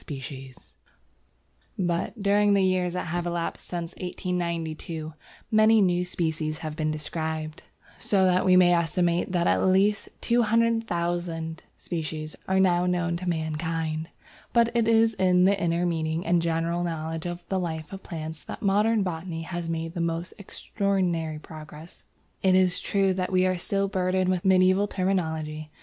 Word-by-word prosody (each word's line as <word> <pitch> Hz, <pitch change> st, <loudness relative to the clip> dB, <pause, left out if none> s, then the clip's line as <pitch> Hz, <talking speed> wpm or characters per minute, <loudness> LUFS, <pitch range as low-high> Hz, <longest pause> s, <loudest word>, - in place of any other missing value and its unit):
But, 180 Hz, +4 st, -2 dB
during 205 Hz, 0 st, +4 dB
the 195 Hz, -, +3 dB
years 185 Hz, -1 st, +1 dB
that 180 Hz, -, -3 dB
have 175 Hz, +1 st, -2 dB
elapsed 170 Hz, -1 st, -3 dB
since 170 Hz, -1 st, -4 dB
1892, 170 Hz, -3 st, -4 dB, 0.4 s
many 220 Hz, 0 st, +5 dB
new 180 Hz, -3 st, +3 dB
species 160 Hz, -3 st, -2 dB
have 155 Hz, -1 st, -4 dB
been 155 Hz, 0 st, -1 dB
described, 155 Hz, 0 st, -4 dB, 0.4 s
so 195 Hz, -2 st, +2 dB
that 185 Hz, 0 st, +3 dB
we 185 Hz, -1 st, +5 dB
may 180 Hz, -1 st, +6 dB
estimate 175 Hz, +1 st, +1 dB
that 175 Hz, -2 st, +1 dB
at -, -, +2 dB
least 195 Hz, +3 st, +2 dB
200,000 175 Hz, -8 st, 0 dB, 0.2 s
species 155 Hz, -2 st, -5 dB
are 190 Hz, 0 st, +2 dB
now 180 Hz, -1 st, +3 dB
known 175 Hz, -1 st, 0 dB
to 180 Hz, +1 st, -3 dB
mankind. 160 Hz, 0 st, -2 dB, 0.4 s
But 235 Hz, 0 st, +3 dB
it 230 Hz, -2 st, +2 dB
is 225 Hz, 0 st, +4 dB
in 180 Hz, -2 st, +3 dB
the 195 Hz, +1 st, +3 dB
inner 170 Hz, 0 st, +1 dB
meaning 160 Hz, -1 st, -1 dB
and 170 Hz, 0 st, +3 dB
general 165 Hz, +1 st, 0 dB
knowledge 160 Hz, 0 st, -3 dB
of 175 Hz, 0 st, -6 dB
the 190 Hz, -, 0 dB
life 160 Hz, -2 st, -4 dB
of 195 Hz, -, -7 dB
plants 160 Hz, -2 st, -6 dB
that -, -, -8 dB
modern 210 Hz, +2 st, +3 dB
botany 165 Hz, -2 st, -4 dB
has 170 Hz, 0 st, -5 dB
made 165 Hz, 0 st, -3 dB
the 175 Hz, -, -3 dB
most 170 Hz, +1 st, -2 dB
extraordinary 185 Hz, -6 st, -1 dB
progress. 155 Hz, +1 st, -11 dB, 0.4 s
It 190 Hz, -1 st, +4 dB
is 185 Hz, -1 st, +3 dB
true 195 Hz, -1 st, +1 dB
that 185 Hz, 0 st, -2 dB
we 185 Hz, 0 st, +3 dB
are 185 Hz, -1 st, 0 dB
still 195 Hz, +2 st, 0 dB
burdened 185 Hz, -1 st, 0 dB
with 180 Hz, 0 st, -2 dB
medieval 185 Hz, +1 st, +4 dB
terminology. 160 Hz, -6 st, -2 dB
175 Hz, 150 wpm, -26 LUFS, 165-190 Hz, 0.4 s, may